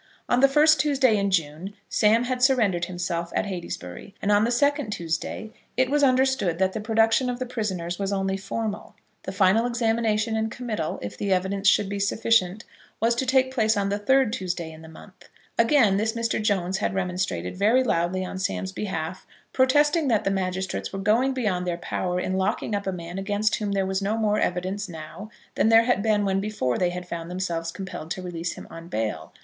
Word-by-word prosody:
On 245 - +2
the 275 - +7
first 300 +2 +5
Tuesday 265 -5 +3
in 200 -1 +1
June 170 +2 -2
Sam 220 +3 +3
had 250 0 -2
surrendered 220 -10 +3
himself 175 -1 -3
at - - +1
Heytesbury, 175 - -7
and 205 - 0
on 205 +1 +4
the - - 0
second 285 +1 +1
Tuesday 170 +4 -4 0.3
it 260 +1 +2
was 295 0 +2
understood 260 - +2
that 190 +1 +1
the 220 - -3
production 225 +3 +2
of 245 - -2
the 255 - -3
prisoners 190 -8 -3
was 195 0 -1
only 195 -1 0
formal. 205 +2 -4 0.3
The 190 - -3
final 195 +4 +3
examination, 225 -2 0
and 220 0 0
committal, 220 -9 -4
if 100 - -5
the 200 - -2
evidence 190 +2 0
should 195 - +4
be 200 0 -4
sufficient, 205 -1 +1 0.4
was 230 +1 +3
to 255 +3 -2
take 260 0 +3
place 220 -3 +2
on 200 -1 0
the 205 +1 -1
third 260 +1 +3
Tuesday 180 -7 -3
in 160 0 -12
the 160 - -12
month. 185 +4 -15 0.3
Against 230 -5 +4
this 220 +1 0
Mr. 220 - -1
Jones 190 -3 0
had 190 - -1
remonstrated 180 - -2
very 220 +7 +3
loudly 185 -4 0
on 185 - -6
Sam's 190 0 -2
behalf, 185 -3 -4 0.3
protesting 295 +4 +3
that 225 -5 +2
the 195 - 0
magistrates 190 0 -2
were 195 - -5
going 220 +7 +2
beyond 190 -8 -1
their 175 -1 -1
power 180 +1 -2
in 185 - -2
locking 200 +2 -1
up 200 -1 -2
a - - +1
man 175 +1 -6
against 205 +2 0
whom 205 -2 -2
there 195 -1 +1
was 190 +1 -1
no 205 +3 0
more 215 -1 +1
evidence 185 +3 -2
now 160 +5 -9 0.2
than 220 - +2
there 225 0 +7
had 245 -4 +1
been 210 -1 +2
when 195 0 +1
before 195 - -1
they 180 - +2
had 180 0 -6
found 170 -1 -5
themselves 170 -2 -3
compelled 190 -4 -7
to 185 +2 -4
release 175 -1 -4
him - - -10
on 165 0 -9
bail. 110 - -3
200 Hz, 205 wpm, -25 LUFS, 180-225 Hz, 0.4 s, the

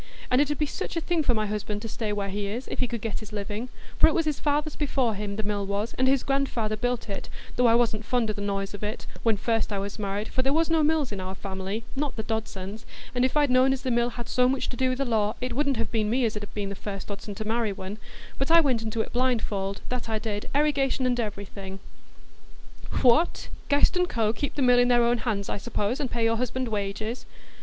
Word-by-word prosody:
And 250 +2 +5
it 290 - +2
'ud 295 - -1
be 300 - +1
such 310 - -4
a - - +3
thing 335 0 0
for 250 -5 +2
my 215 -1 +1
husband 210 0 -3
to - - -3
stay 220 -1 -3
where 200 -1 -1
he 200 +1 -2
is, 235 +6 -4
if - - -4
he 250 - +2
could 235 -2 -4
get 225 -1 -2
his 215 -1 -10
living: 210 +3 -4 0.3
for - - +9
it - - +2
was 330 -2 +2
his 305 -2 0
father's 295 +1 0
before 270 -6 +1
him, 205 0 -4
the 220 - -2
mill 205 -1 -1
was, 200 +3 -2
and 260 - +2
his 270 -1 +3
grandfather 270 -6 0
built 245 +2 -1
it, 200 - -5 0.3
though 250 -1 +4
I 230 - +6
wasn't 225 -2 +2
fond 240 +1 +1
o' - - -3
the 205 - -6
noise 195 0 -2
of 205 - -7
it, 210 +2 -3 0.2
when 225 -2 +2
first 225 +1 0
I 200 - 0
was 200 +2 -4
married, 205 +1 -2
for 260 - 0
there 270 +2 +2
was 325 +1 +2
no 325 -1 +4
mills 300 -4 +2
in 200 - -4
our 185 +1 -4
family,—not 205 +9 -4
the 220 - -3
Dodson's,—and 220 +2 -4
if 260 +3 +2
I'd 290 -3 +4
known 255 +1 +5
as 265 - -4
the 255 - 0
mills 240 0 +2
had 240 -1 -6
so 250 0 +3
much 265 0 0
to - - -5
do 260 0 +2
with 255 - -1
the 275 - 0
law, 215 -3 +1
it 250 -1 -2
wouldn't 280 -2 +1
have - - -2
been 215 -2 +1
me 245 +2 +2
as 220 - 0
'ud 210 - -3
have 205 - -8
been 205 -2 -2
the - - -3
first 195 0 -6
Dodson 200 0 -6
to 215 - -5
marry 225 -1 +1
one; 195 +1 -6 0.4
but 270 +2 0
I 335 +1 +8
went 260 -8 +2
into 220 0 -1
it - - -5
blindfold, 220 -6 0
that 250 -2 -3
I 220 - +1
did, 210 -1 -4
erigation 280 -3 +2
and 245 -1 +2
everything." 200 -3 -5 1.2
"What! 285 +7 +4 0.2
Guest 285 +5 +4
&Co. 230 -2 +1
would 215 +2 +1
keep 285 +4 -3
the 280 - +1
mill 245 -1 +6
in 245 - +5
their 240 -1 +5
own 235 0 +3
hands, 210 -3 -1
I - - -2
suppose, 215 +2 -1
and 275 - -1
pay 235 -1 -1
your 225 0 +3
husband 250 +1 -1
wages?" 215 +3 -3
230 Hz, 260 wpm, -27 LUFS, 205-255 Hz, 1.2 s, for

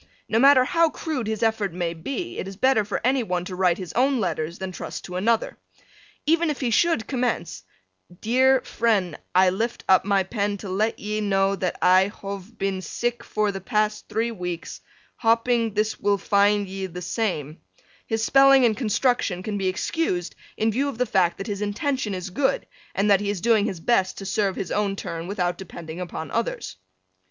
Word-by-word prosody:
No 225 - +2
matter 270 0 +7
how 330 +5 +3
crude 290 -7 -4
his 220 0 -2
effort 220 -5 0
may 175 -1 -2
be 275 - -5
it - - -4
is 195 - -7
better 260 -2 +3
for 205 0 -3
any 260 +2 +2
one 180 -5 -2
to 185 - -6
write 180 -2 +2
his 185 -3 -7
own 265 +1 +2
letters 170 -4 -2
than 190 -1 -5
trust 175 - -7
to 180 - -7
another. 225 +5 0 0.7
Even 330 +1 +3
if 295 - -2
he 250 -4 -1
should 325 -1 +2
commence, 240 - -2 0.6
"deer 260 +3 +3
fren, 210 -7 0 0.2
i 185 0 +6
lift 230 +5 -2
up 190 -1 +5
my 195 -1 +2
pen 205 +1 -2
to 200 - -8
let 210 +4 0
ye 210 +1 -3
no 195 -1 +2
that 185 -2 -2
i 185 +1 +6
hove 200 +1 -8
been 195 -1 -2
sik 240 +7 -3
for 215 -1 0
the 195 -1 -6
past 215 +1 -1
3 225 +2 0
weeks, 180 -5 -6 0.4
hopping 230 -1 +2
this 215 +1 0
will 205 0 +2
findye 200 -1 +1
the 180 +1 -7
same," 165 - -2 0.5
his 225 0 -1
spelling 270 0 +6
and 220 -2 +3
construction 220 -5 0
can 210 0 -3
be 195 -2 -1
excused 185 - -1 0.2
in 220 +1 +2
view 275 +6 0
of 275 - -7
the 250 - +1
fact 180 -6 +2
that 195 - -5
his 205 -2 -4
intention 210 +1 -1
is 185 0 -6
good, 275 - 0 0.3
and 205 +1 +2
that 200 -1 +5
he 205 - -2
is 205 -2 -2
doing 220 0 +3
his 190 -6 -3
best 190 0 +1
to 195 - -7
serve 195 -1 0
his 185 - -4
own 205 -1 0
turn 165 -3 -5
without 180 -3 -1
depending 170 -3 -8
upon 170 -2 -6
others. 230 - -3
205 Hz, 195 wpm, -24 LUFS, 185-235 Hz, 0.7 s, matter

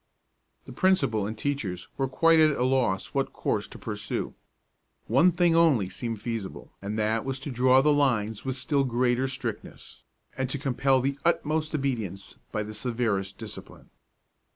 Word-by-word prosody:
The - - -10
principal 150 - +2
and 110 +1 -5
teachers 110 -11 -3
were 135 - 0
quite 165 +5 +4
at 155 -2 +4
a - - +1
loss 125 -7 +1
what - - 0
course - - -1
to - - -11
pursue. - - -4 0.7
One 140 +11 +4
thing 175 -1 +3
only 145 - +4
seemed 115 +3 -4
feasible, 115 -5 -5
and 100 +2 -4
that 110 +1 +1
was 135 0 -3
to 140 - -5
draw 130 +1 +4
the 150 +2 +4
lines 115 -7 +1
with 130 -1 -2
still 140 +2 +1
greater 125 +1 +1
strictness, 130 - -7 0.3
and 130 -1 -2
to 145 - -2
compel 135 -1 +1
the 135 +2 -2
utmost 155 -2 0
obedience 115 - -3
by 105 - -1
the 105 +1 -8
severest 105 -4 -2
discipline. - - -10
130 Hz, 160 wpm, -27 LUFS, 110-140 Hz, 0.7 s, quite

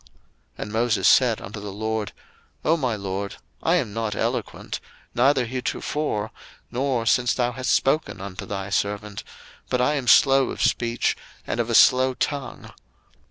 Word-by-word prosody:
02:004:010 - - -25 0.5
And 105 - -6
Moses 110 -3 +2
said 120 -4 +5
unto 105 +2 -7
the 100 0 -6
LORD, 110 +1 -3 0.5
O 160 - +4
my 130 -8 -1
LORD, 100 0 -4 0.3
I - - +2
am 100 - -1
not 110 -2 -2
eloquent, - - -3 0.3
neither 130 +1 +3
heretofore, 125 -2 -2 0.4
nor 125 -2 0
since 120 +1 +3
thou 120 -1 +1
hast 130 +1 -2
spoken 135 -7 +1
unto 95 -1 -7
thy 100 -1 -4
servant: 100 0 -2 0.5
but 125 - +1
I 125 +4 +2
am 135 -4 -2
slow 135 +3 +6
of - - -6
speech, 120 0 +1 0.3
and - - -3
of 120 0 0
a 115 - +1
slow 130 +2 +6
tongue. 140 0 -4
115 Hz, 160 wpm, -24 LUFS, 105-130 Hz, 0.5 s, slow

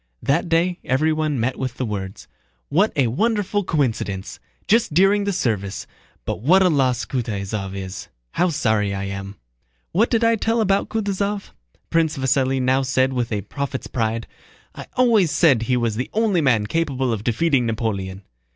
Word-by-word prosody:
That 165 +5 +1
day 175 +2 +1
everyone 155 +1 +1
met 125 +3 -1
with 130 -2 -3
the 130 - -2
words: 100 -3 -5 0.4
"What 190 +9 +3
a 140 - +3
wonderful 205 - 0
coincidence! 110 - -2 0.3
Just 220 -8 +2
during 200 +3 +4
the 200 - 0
service. 105 - -2 0.4
But - - -3
what 185 - +5
a 185 - +4
loss 130 -6 +1
Kutáysov 100 -5 -3
is! 95 0 -6 0.2
How 180 +2 +1
sorry 110 -9 0
I 95 - -3
am!" 100 0 -6 0.6
"What 215 +7 +2
did 230 -1 +1
I 230 0 +4
tell 225 +2 0
about 200 -2 +1
Kutúzov?" 205 -1 -2 0.4
Prince 165 -2 +1
Vasíli 130 0 +1
now 130 +1 +2
said 130 0 +1
with 120 -2 -2
a 105 -2 -1
prophet's 140 +5 -5
pride. 115 -1 -2 0.5
"I - - -9
always 230 -8 +4
said 140 -6 +4
he 125 +2 +1
was 115 -3 -1
the 125 - -3
only 215 -5 +2
man 120 -7 +2
capable 135 -3 -1
of 105 -2 -4
defeating 125 +1 +1
Napoleon." 100 -4 -3
130 Hz, 165 wpm, -22 LUFS, 110-180 Hz, 0.6 s, what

